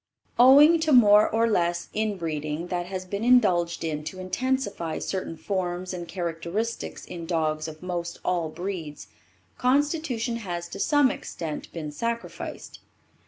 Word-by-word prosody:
Owing 290 +6 +8
to 315 -1 +1
more 210 -5 +7
or 230 +1 +2
less 175 -5 0
inbreeding 165 -6 -2
that 175 -1 -2
has 185 0 -5
been 200 +3 -4
indulged 185 -10 +3
in 155 -2 -3
to 185 - -6
intensify 200 -4 -2
certain 185 -4 -4
forms 185 -1 -3
and 175 -1 -6
characteristics 170 +6 -4
in 170 -2 -7
dogs 155 -2 0
of 155 +1 -10
most 175 -1 -4
all 175 -3 0
breeds, 165 -4 -6 0.5
constitution 260 -3 +1
has 175 -6 -5
to - - -8
some 290 -3 +4
extent 155 -3 -6
been 155 -3 -5
sacrificed. 230 +8 -5
185 Hz, 135 wpm, -26 LUFS, 170-230 Hz, 0.5 s, Owing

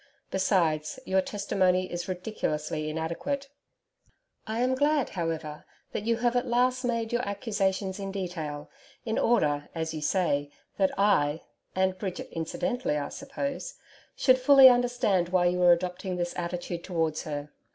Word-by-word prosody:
Besides, 170 -6 +1
your 190 0 +2
testimony 185 -2 0
is 175 0 -4
ridiculously 155 -5 -3
inadequate. 170 - -3 1.0
I 220 +2 -1
am 255 +1 +2
glad, 290 0 +2
however, 165 -4 -4 0.3
that 205 - -4
you 230 0 +2
have 240 +1 +1
at 245 - +1
last 250 +2 +2
made 230 -2 -1
your 240 - +2
accusations 200 -2 -1
in 195 -1 -4
detail 165 -6 -4 0.4
in 220 -1 0
order, 150 -11 +2
as 160 0 -2
you 155 - -5
say 150 -4 +1 0.3
that 190 -1 +3
I 165 -7 +2 0.3
and 190 0 +1
Bridget, 185 -3 -5
incidentally, 205 - -2
I 145 -1 -3
suppose 280 - -5 0.4
should 255 -1 +4
fully 270 0 +9
understand 240 -8 +2
why 180 -1 +3
you 180 +1 +2
are 175 -1 +7
adopting 180 +2 0
this 175 -1 -2
attitude 175 0 -4
towards 160 -4 -1
her. 145 -1 -5
185 Hz, 145 wpm, -28 LUFS, 165-235 Hz, 1.0 s, fully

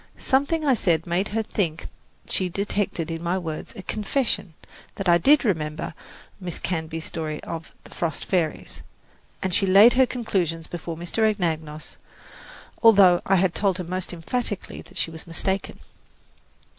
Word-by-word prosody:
Something 285 +4 +1
I 275 - +5
said 170 -8 +1
made 175 +4 0
her 220 +2 -1
think 170 -7 -2 0.4
she 185 -1 -1
detected 195 -3 -2
in 165 0 -4
my 175 +2 0
words 160 -4 -5
a 190 - -8
confession 215 - -1 0.4
that 195 - -4
I 170 0 +6
did 280 - +5
remember 155 -6 -1 0.5
Miss 180 -3 -5
Canby's 160 -2 -3
story 155 -2 -4
of 165 -1 -6
"The - - -15
Frost 165 -2 -2
Fairies," 170 -5 -1 0.6
and 190 -1 -1
she 195 - +3
laid 200 +6 +8
her 260 0 +4
conclusions 180 -10 -1
before 165 -1 -6
Mr. 175 +6 -4
Anagnos, 160 -7 -1 0.8
although 195 -6 +7
I 195 - +4
had 185 -1 +2
told 195 -3 +1
her 180 - -3
most 185 +2 -4
emphatically 205 +5 -3
that - - -12
she 165 - 0
was 160 +1 -10
mistaken. 190 +4 -1
180 Hz, 155 wpm, -24 LUFS, 165-205 Hz, 0.8 s, laid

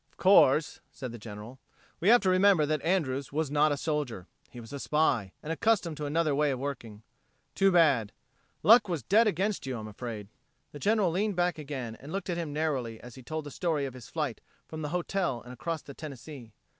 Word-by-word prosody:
"Of - - -33
course," 165 -6 +5
said 130 -3 -7
the 120 - -9
General, 105 +4 -9 0.4
"we 175 - -1
have 240 +1 +7
to 190 - +2
remember 185 -4 +5
that 155 -1 -1
Andrews 140 -7 0
was 150 -1 -1
not 150 +1 +3
a 145 - 0
soldier 145 - -3 0.2
he 120 - -10
was 115 +3 -11
a 140 - -5
spy, 130 -11 +1
and 160 - -2
accustomed 185 -3 +1
to 150 -1 -3
another 155 0 +1
way 150 +1 +2
of 135 - -1
working. 120 -6 -6 0.5
Too 195 0 +3
bad.... 140 - +4 0.5
Luck 215 +3 +7
was 170 -5 -2
dead 220 +4 +4
against 200 -4 -1
you, 130 -2 -3
I'm 110 -1 -7
afraid." 105 -1 -7 0.4
The 145 - -9
General 205 -2 +2
leaned 200 +3 0
back 175 -2 0
again 135 -6 -5
and 140 +4 -10
looked 195 0 -3
at 170 - -2
him 165 -3 -3
narrowly 135 -7 -2
as 120 0 -11
he 130 - -11
told 155 +4 -5
the 145 - -7
story 160 -5 -1
of 135 - -6
his 130 -2 -11
flight 150 -9 -3 0.3
from 160 0 -7
the 150 - -3
hotel 180 -5 -1
and 125 - -10
across 160 +5 -4
the 140 - -10
Tennessee. 135 -4 -9
150 Hz, 215 wpm, -29 LUFS, 125-175 Hz, 0.5 s, have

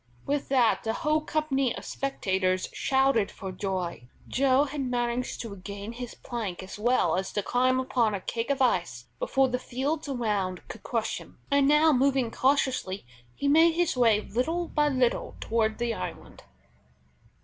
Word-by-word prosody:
With 285 0 -1
that 250 -4 +3
the 225 - -1
whole 305 +4 +1
company 285 -5 0
of - - -8
spectators 190 -8 -1
shouted 265 -6 +2
for 190 - -7
joy. 180 - -4 0.2
Joe 270 +1 +3
had 295 0 -4
managed 245 -1 -1
to 230 - -6
regain 200 +2 -7
his 245 0 -7
plank 215 -8 -5
as 190 +2 -9
well 225 -7 +2
as 190 - -2
to 205 - -1
climb 255 +3 +2
upon 240 -5 +1
a - - -3
cake 230 +6 -3
of 275 -1 +2
ice 170 - 0
before 270 -1 +2
the 250 0 -1
fields 280 +5 -3
around 205 -8 -2
could 220 - -9
crush 230 -2 -2
him, - - -15
and 280 -1 +4
now 300 +2 +5
moving 265 -2 +2
cautiously, 260 - 0 0.3
he 285 - -2
made 320 +3 +6
his 350 -4 +1
way, 225 -4 +4
little 320 - -2
by 295 -1 +2
little 255 -3 0
toward 220 -1 0
the 235 -1 -1
island. - - -7
245 Hz, 165 wpm, -27 LUFS, 210-275 Hz, 0.3 s, made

